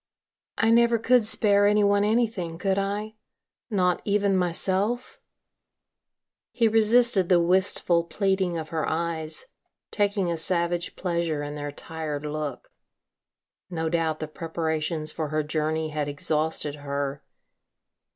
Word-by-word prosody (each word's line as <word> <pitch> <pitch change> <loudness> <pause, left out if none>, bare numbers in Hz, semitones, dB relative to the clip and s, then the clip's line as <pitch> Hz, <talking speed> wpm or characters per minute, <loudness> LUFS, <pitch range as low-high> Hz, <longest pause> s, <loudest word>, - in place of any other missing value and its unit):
"I 225 0 +3
never 235 0 +4
could 230 0 +3
spare 205 -2 +3
any 210 0 +3
one 200 0 +3
anything, 210 -7 0
could 195 +2 0
I? 205 +2 -3 0.6
Not 180 -5 +1
even 200 -1 +1
myself?" 190 +6 0 1.3
He 235 -2 +2
resisted 225 -3 +4
the 180 -2 +5
wistful 175 -1 +2
pleading 190 -2 0
of 160 -1 -5
her 160 -1 -2
eyes, 160 - -2 0.5
taking 200 -4 0
a 170 - -2
savage 170 0 0
pleasure 170 -4 -2
in 145 0 -5
their 145 0 -5
tired 150 -1 -5
look. 150 -3 -5 1.0
No 165 -2 -2
doubt 160 -2 0
the 155 - -4
preparations 160 0 -3
for 160 -2 -3
her 155 +1 -1
journey 155 +1 -1
had 150 -1 -2
exhausted 150 0 -1
her. 140 -1 -4
170 Hz, 125 wpm, -25 LUFS, 155-205 Hz, 1.3 s, the